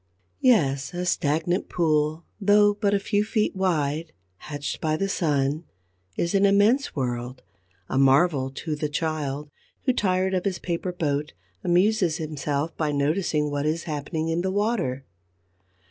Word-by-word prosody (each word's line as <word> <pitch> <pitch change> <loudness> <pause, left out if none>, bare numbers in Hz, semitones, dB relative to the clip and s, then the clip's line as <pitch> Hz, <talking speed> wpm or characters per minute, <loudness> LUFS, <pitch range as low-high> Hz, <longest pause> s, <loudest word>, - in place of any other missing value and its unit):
Yes, 140 - +2
a 180 +1 -2
stagnant 170 +1 0
pool, 155 -1 +1
though 205 0 +5
but 205 -1 +1
a - - +2
few 205 +1 +1
feet 215 -1 0
wide, 160 -4 -1 0.2
hatched 145 +4 -5
by 155 -1 0
the 195 - 0
sun, 150 -4 0 0.5
is 170 - 0
an 195 0 +3
immense 205 +8 +3
world, 125 -1 -3 0.4
a 130 - 0
marvel 135 0 +4
to 150 +3 -4
the 150 0 -2
child 150 -2 -3 0.3
who, 255 - +2
tired 190 -4 +1
of 185 -1 0
his 190 -3 0
paper 175 +1 -3
boat, 150 -4 -2 0.3
amuses 180 -2 +2
himself 150 -1 -3
by 155 -2 -1
noticing 150 +1 0
what 145 +1 -1
is 160 +2 -1
happening 155 +1 -3
in 165 +1 0
the 190 - -1
water. 190 - -1
160 Hz, 145 wpm, -25 LUFS, 145-190 Hz, 0.5 s, though